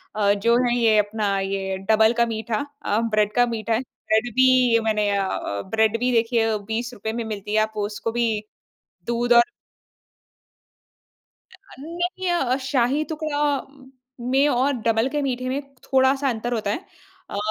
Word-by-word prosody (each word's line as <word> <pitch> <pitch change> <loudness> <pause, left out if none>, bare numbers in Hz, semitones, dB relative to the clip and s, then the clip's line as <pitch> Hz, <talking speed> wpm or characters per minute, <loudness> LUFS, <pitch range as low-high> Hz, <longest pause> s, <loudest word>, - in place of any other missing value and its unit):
अ, 205 -1 +3
जो 230 +4 +2
है 240 0 +1
ये 225 -2 +4
अपना 205 -1 0
ये 195 0 -2
डबल 220 +1 +5
का 235 - +4
मीठा 225 +3 -3 0.2
अ, 210 +2 +1
ब्रेड 215 -2 +1
का 245 0 +5
मीठा 230 -1 -2
है, 230 - +1
ब्रेड 230 -2 -2
भी 255 -3 +5
मैंने 210 -2 +1
अ 195 - +1
अ, 100 - -3
ब्रेड 220 +1 +2
भी 250 +1 +1
देखिए 230 -2 +2
₹20 225 -1 -3
में 235 0 -3
मिलती 210 -1 -5
है, 215 - +4
आप 220 0 -2
उसको 210 +2 -3
भी 235 +1 0 0.8
दूध 240 +1 +1
और 235 0 +8 2.1
अ, 370 - -18
नहीं 350 +4 -3
अ 345 - +1
अ, 255 0 +1
शाही 270 +2 +1
टुकड़ा 310 -2 -2 0.9
में 275 +3 +3
और 265 +3 +2
डबल 225 +2 +2
के 295 0 -2
मीठे 255 -2 -2
में 275 +2 -2 0.2
थोड़ा-सा 270 +1 +2
अंतर 240 +1 -2
होता 210 -3 -1
है। 285 - -2 0.5
अ, 200 - -5
235 Hz, 165 wpm, -23 LUFS, 215-255 Hz, 2.1 s, और